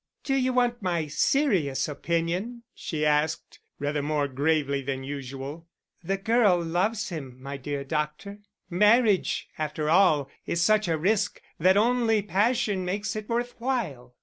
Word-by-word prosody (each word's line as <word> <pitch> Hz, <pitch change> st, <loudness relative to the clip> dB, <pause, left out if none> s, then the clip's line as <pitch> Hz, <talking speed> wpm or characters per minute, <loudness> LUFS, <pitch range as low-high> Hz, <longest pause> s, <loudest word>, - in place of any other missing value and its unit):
"Do 270 Hz, -, -1 dB
you 260 Hz, -1 st, +2 dB
want 245 Hz, -1 st, +1 dB
my 175 Hz, -4 st, 0 dB
serious 155 Hz, -, +1 dB
opinion?" 170 Hz, +10 st, -2 dB
she 155 Hz, -2 st, -3 dB
asked, 150 Hz, +1 st, 0 dB, 0.2 s
rather 145 Hz, +1 st, -1 dB
more 145 Hz, 0 st, 0 dB
gravely 140 Hz, 0 st, 0 dB
than 135 Hz, 0 st, -4 dB
usual. 140 Hz, +3 st, -7 dB, 0.4 s
"The 195 Hz, +3 st, -1 dB
girl 210 Hz, -3 st, +3 dB
loves 190 Hz, +6 st, -1 dB
him, 135 Hz, -7 st, -7 dB
my 140 Hz, +1 st, -6 dB
dear 140 Hz, +1 st, -4 dB
doctor. 150 Hz, +8 st, -3 dB, 0.3 s
Marriage, 210 Hz, +3 st, +3 dB
after 155 Hz, 0 st, -1 dB
all, 165 Hz, -6 st, +4 dB, 0.2 s
is 170 Hz, -, -1 dB
such 215 Hz, +4 st, +3 dB
a 165 Hz, -1 st, +1 dB
risk 205 Hz, +5 st, 0 dB, 0.2 s
that 185 Hz, +4 st, +4 dB
only 225 Hz, -1 st, +2 dB
passion 205 Hz, -1 st, +1 dB
makes 205 Hz, +4 st, -2 dB
it 215 Hz, -1 st, -6 dB
worth 240 Hz, +1 st, -1 dB
while." 170 Hz, -, -3 dB
175 Hz, 145 wpm, -26 LUFS, 150-215 Hz, 0.4 s, all